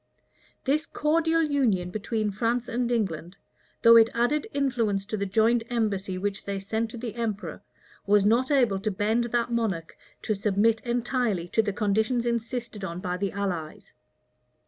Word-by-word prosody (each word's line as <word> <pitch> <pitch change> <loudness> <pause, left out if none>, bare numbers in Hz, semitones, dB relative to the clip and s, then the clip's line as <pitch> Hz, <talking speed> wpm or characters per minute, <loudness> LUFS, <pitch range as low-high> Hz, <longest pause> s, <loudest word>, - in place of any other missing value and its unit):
This 300 +3 +1
cordial 325 +2 +1
union 235 - +1
between 215 +1 -2
France 230 +4 -1
and 240 +1 -1
England, 185 -5 -2 0.5
though 230 0 +9
it 225 0 +6
added 265 - +1
influence 230 -8 0
to 215 - -3
the 200 -1 -2
joint 225 +4 +3
embassy 200 -5 -1
which 200 +1 -3
they 200 0 -2
sent 220 +4 -2
to 235 - -8
the 230 -1 -5
emperor, 220 -3 -4 0.5
was 205 0 +4
not 235 +5 +3
able 245 -9 +3
to 215 +2 -1
bend 215 +4 0
that 240 0 -1
monarch 205 -9 -2 0.3
to 215 - 0
submit 210 +2 +2
entirely 240 -6 -1
to 225 - +3
the 210 -2 -2
conditions 220 +4 0
insisted 235 -2 -3
on 170 -2 -4
by 180 -1 -3
the 195 +1 -2
allies. 180 -6 -4
220 Hz, 160 wpm, -26 LUFS, 200-240 Hz, 0.5 s, though